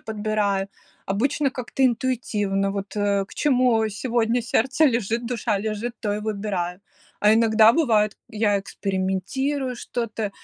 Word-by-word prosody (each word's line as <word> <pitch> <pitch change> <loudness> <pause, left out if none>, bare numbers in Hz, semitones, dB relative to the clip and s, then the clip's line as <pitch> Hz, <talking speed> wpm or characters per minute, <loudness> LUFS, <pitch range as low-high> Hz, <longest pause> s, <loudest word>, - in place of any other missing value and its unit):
подбираю. 210 -2 -1 0.4
Обычно 270 +8 0
как-то 250 +1 -4
интуитивно, 215 -6 0
вот, 200 +1 -5
э, 200 -1 +1
к - - -17
чему 250 -6 +2
сегодня 230 +2 0
сердце 265 +6 +2
лежит, 235 -2 +1
душа 230 -3 -1
лежит, 220 +3 -3
то 210 -3 -1
и 210 - -2
выбираю. 200 -4 -3 0.4
А 210 +1 +5
иногда 220 0 +5
бывает, 220 -9 +2
я 210 -2 +1
экспериментирую 200 +9 -2
что-то. 225 -3 -4
220 Hz, 125 wpm, -23 LUFS, 200-245 Hz, 0.4 s, А